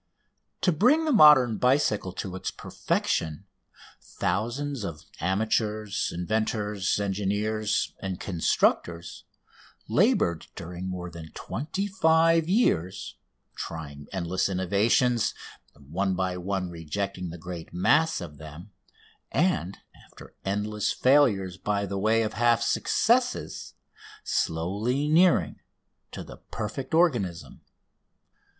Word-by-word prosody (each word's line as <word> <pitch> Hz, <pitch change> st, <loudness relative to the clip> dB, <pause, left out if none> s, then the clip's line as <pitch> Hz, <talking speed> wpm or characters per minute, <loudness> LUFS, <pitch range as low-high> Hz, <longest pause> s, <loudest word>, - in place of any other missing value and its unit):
To 180 Hz, -, +3 dB
bring 255 Hz, -, +3 dB
the 310 Hz, -, +1 dB
modern 150 Hz, -, +7 dB
bicycle 125 Hz, -7 st, +2 dB
to 95 Hz, -1 st, -5 dB
its 95 Hz, -, -3 dB
perfection 80 Hz, +4 st, -2 dB, 0.6 s
thousands 120 Hz, +7 st, -2 dB
of 80 Hz, -5 st, -6 dB, 0.2 s
amateurs, 105 Hz, +3 st, 0 dB
inventors, 105 Hz, +2 st, -1 dB
engineers, 105 Hz, +2 st, -1 dB
and 95 Hz, -2 st, -4 dB
constructors 85 Hz, -1 st, 0 dB, 0.6 s
laboured 85 Hz, -2 st, +2 dB
during 90 Hz, +2 st, -6 dB
more 90 Hz, -1 st, -5 dB
than 80 Hz, -1 st, -9 dB
twenty 160 Hz, -, -4 dB
five 165 Hz, -3 st, +3 dB
years, 95 Hz, -, +1 dB, 0.4 s
trying 75 Hz, -3 st, -7 dB
endless 95 Hz, 0 st, -1 dB
innovations, 100 Hz, +6 st, +2 dB, 0.4 s
one 90 Hz, +7 st, -2 dB
by 90 Hz, 0 st, -1 dB
one 90 Hz, 0 st, -3 dB
rejecting 90 Hz, +3 st, -4 dB
the 85 Hz, -, -8 dB
great 85 Hz, -1 st, -8 dB
mass 155 Hz, -, +2 dB
of 75 Hz, -5 st, -9 dB
them, 80 Hz, +6 st, -11 dB, 0.6 s
and, 165 Hz, -, 0 dB, 0.3 s
after -, -, -15 dB
endless 105 Hz, +2 st, -1 dB
failures 110 Hz, -10 st, +3 dB
by 100 Hz, 0 st, -1 dB
the 100 Hz, 0 st, -3 dB
way 110 Hz, +3 st, +3 dB
of 110 Hz, -, -3 dB
half 120 Hz, 0 st, +3 dB
successes, -, -, 0 dB, 0.5 s
slowly 105 Hz, -, -1 dB
nearing 170 Hz, +4 st, +3 dB, 0.5 s
to -, -, -7 dB
the -, -, -11 dB
perfect 115 Hz, +8 st, -5 dB
organism. 120 Hz, -, 0 dB
100 Hz, 105 wpm, -27 LUFS, 90-120 Hz, 0.6 s, modern